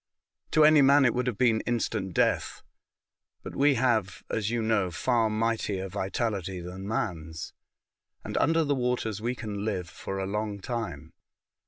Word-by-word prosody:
To 155 - +3
anv 150 -1 +7
man 140 +1 +6
it 120 - +3
would 125 0 -1
have 120 -5 -1
been 115 -3 +3
instant 115 -4 -1
v 95 - -9
death, - - 0 0.8
but - - -7
we 140 0 +4
have, 110 -6 0
as 110 -2 -1
you 115 -1 -1
know, 110 -4 +1
far 115 +6 +1
mightier 110 -3 -1
vitality 95 -1 -2
than 90 +3 -7
man's, 85 -10 -3 0.7
and - - -6
under 165 0 +3
the 145 -1 +1
waters 125 -5 -1
we 120 +2 -1
can 105 -4 -5
live 95 -5 -2
for 95 +3 -6
a 95 - -2
long 105 +1 -3
time. 95 - -5
110 Hz, 165 wpm, -28 LUFS, 95-125 Hz, 0.8 s, anv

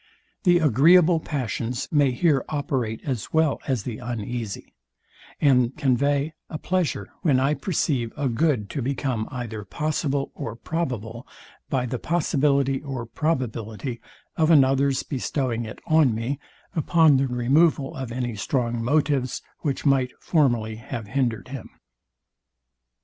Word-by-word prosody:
The 175 -1 +6
agreeable 165 +4 +5
passions 125 -4 -3
may 145 -3 +4
here 135 +1 +2
operate 135 -7 -2
as 125 -7 -3
well 160 -2 +2
as 130 -6 0
the 115 -2 -5
uneasy, 115 -1 -5 0.7
and 125 -3 +3
convey 140 +2 +1 0.2
a 155 - -4
pleasure 165 - -1
when 145 -8 +3
I 135 +3 +2
perceive 140 - -1
a 145 -2 0
good 125 -3 +1
to 140 - -3
become 125 -3 -2
either 115 -5 -5
possible 145 - -2
or 115 - -5
probable 120 -6 -4 0.4
by 130 -2 0
the 125 0 -3
possibility 140 -4 +1
or 135 -5 -5
probability 120 -4 -3 0.4
of 160 -2 +3
another's 135 -2 +4
bestowing 125 -3 -2
it 110 - -8
on 155 -7 +4
me, 125 +5 -2 0.4
upon 160 -2 +4
the 135 +1 +1
removal 135 +4 +2
of 130 -3 -5
any 120 -1 -3
strong 120 +1 -1
motives, 140 -1 +1 0.2
which 140 -1 -2
might 135 -3 +2
formerly 120 -9 +1
have 110 -1 -7
hindered 125 -2 -1
him. 135 -2 -7
135 Hz, 130 wpm, -24 LUFS, 120-150 Hz, 0.7 s, The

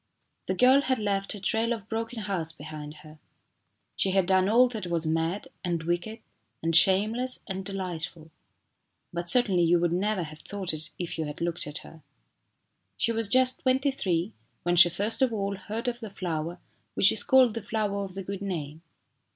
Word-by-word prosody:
The - - -1
girl 260 +2 +5
had 260 -2 0
left 200 -2 -1
a - - -8
trail 225 +4 -1
of 215 -3 -8
broken 225 +1 -4
hearts 185 -6 -3
behind 155 -1 -9
her. 155 0 -14 0.8
She 195 - +1
had 190 -1 +2
done 190 +1 +2
all 245 +3 +5
that 220 -6 -5
was 170 -2 -1
mad, 165 +4 -2
and 170 -3 -2
wicked, 175 +7 -3 0.4
and 165 0 +1
shameless, 215 +8 +4
and 190 -1 -5
delightful. 175 -4 -6 0.8
But 175 0 +1
certainly 205 -7 +4
you 170 +1 +3
would 170 0 0
never 195 +1 0
have 155 -1 -10
thought 195 -2 -1
it 155 0 -5
if 175 -2 -5
you 160 - -1
had 150 0 -7
looked 170 -2 -2
at 150 +2 -6
her. 160 - -14 1.0
She 230 - +2
was 225 -1 0
just 255 +4 +3
twenty 265 +2 +1
three 185 -5 -2 0.3
when 175 0 +1
she 175 0 +8
first 205 +8 -1
of 260 -2 +3
all 200 -2 -2
heard 215 +5 -6
of 240 -1 -2
the 220 -3 -7
flower 170 -3 -4 0.4
which 200 - +8
is 215 - +5
called 260 -4 +4
the 230 - -4
flower 205 -1 -2
of 190 -1 -8
the 195 - -5
good 195 +1 -6
name. 160 -6 -5
195 Hz, 190 wpm, -27 LUFS, 170-220 Hz, 1.0 s, she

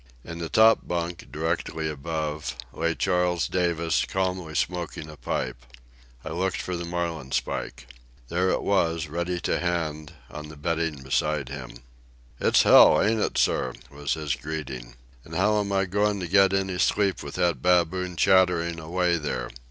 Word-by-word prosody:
In 85 0 -8
the 85 -1 -4
top 110 +7 +5
bunk, 85 0 -4
directly 80 0 -2
above, 75 0 -3 0.2
lay 85 0 -1
Charles 90 -3 +1
Davis, 85 -3 +1
calmly 90 -4 -2
smoking 85 -3 -2
a 75 - -10
pipe. - - -4 0.6
I - - -4
looked 90 +4 -1
for 90 - -3
the 85 0 -4
marlin 85 -5 -3
spike. 65 - -3 0.4
There 90 +6 +1
it - - 0
was, 85 -5 +1
ready 85 +3 -3
to - - 0
hand, 80 -4 -2 0.2
on 75 0 -8
the 75 - -10
bedding 80 -2 -2
beside 70 +1 0
him. 65 -3 -8 0.6
"It's - - +4
hell, 75 - +8
ain't 110 +1 +2
it, - - -1
sir?" - - +1 0.2
was 70 -1 -2
his 75 -3 -2
greeting. 65 -5 -6 0.3
"And 80 - -10
how 105 +4 +3
am 100 -1 -2
I 95 0 +2
goin' 105 +2 0
to 90 - -3
get 95 +1 +5
any 95 -2 -1
sleep 100 -2 +2
with - - -7
that 85 -7 +1
baboon 90 +1 +2
chattering 90 -3 +3
away 85 +2 0
there. 65 -5 -3
85 Hz, 160 wpm, -26 LUFS, 75-90 Hz, 0.6 s, hell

